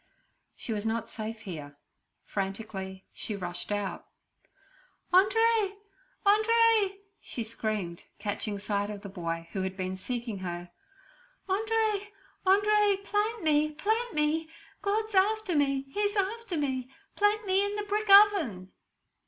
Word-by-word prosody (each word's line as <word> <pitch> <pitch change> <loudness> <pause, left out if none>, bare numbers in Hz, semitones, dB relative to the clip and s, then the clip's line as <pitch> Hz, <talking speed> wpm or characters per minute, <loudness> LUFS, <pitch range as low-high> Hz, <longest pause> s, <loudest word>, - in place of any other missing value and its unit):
She 225 - -4
was 205 -1 -2
not 225 +1 -2
safe 220 0 -6
here; 150 -8 -8 0.5
frantically 195 -1 -4
she 215 - -4
rushed 175 0 -4
out. 205 -2 -3 1.1
'Andree, 415 +1 +4 0.5
Andree!' 430 -1 +4 0.2
she 235 - -4
screamed, 215 -6 -4
catching 205 0 -2
sight 205 0 -1
of 205 -1 -6
the 200 - -6
boy, 165 -3 -4
who 195 - -2
had 190 0 -3
been 185 0 -2
seeking 230 +1 -4
her. 175 -1 -5 0.8
'Andree, 425 0 +1 0.4
Andree, 410 +1 +4
plant 420 +1 -1
me, 305 0 +3
plant 440 +6 -1
me! 310 +2 +1 0.3
God's 430 +2 -1
after 405 -1 +2
me; 275 -2 +2
He's 410 +3 0
after 405 -1 -1
me! 260 -3 -1 0.3
Plant 415 +1 +2
me 385 +1 +3
in 405 0 -2
the 420 - -2
brick 420 +1 -1
oven!' 370 - +6
305 Hz, 130 wpm, -29 LUFS, -, 1.1 s, oven